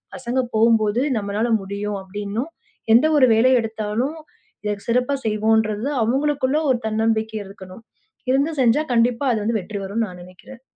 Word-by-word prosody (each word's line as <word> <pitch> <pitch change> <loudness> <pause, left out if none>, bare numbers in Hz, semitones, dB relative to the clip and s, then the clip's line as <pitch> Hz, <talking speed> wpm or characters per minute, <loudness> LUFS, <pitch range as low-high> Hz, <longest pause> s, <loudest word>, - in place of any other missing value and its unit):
பசங்க 255 +1 -1
போம்போது 225 0 +3 0.2
நம்மளால 210 +3 -1
முடியும் 200 +1 -4
அப்படின்னும் 205 - -5 0.4
எந்த 240 +6 +6
ஒரு 260 -3 +6
வேலை 230 +4 +4
எடுத்தாலும், 225 +6 -3 0.7
சிறப்பாகச் 250 +3 0
செய்வோம்ன்றது 215 +1 +1 0.2
அவங்களுக்குள்ள 270 +3 +1
ஒரு 245 - +1
தன்னம்பிக்கை 220 0 0
இருக்கணும். 190 +1 -12 0.5
இருந்து 280 +4 +2
செஞ்சா 255 +5 +3
கண்டிப்பா 235 +2 +2
அதுல 220 -3 -1
வந்து 225 0 0
வெற்றி 200 +3 -6
வரும்னு 220 +3 -2
நான் 180 -2 -11
நினைக்கிறேன். 185 +8 -14
225 Hz, 135 wpm, -21 LUFS, 210-250 Hz, 0.7 s, எந்த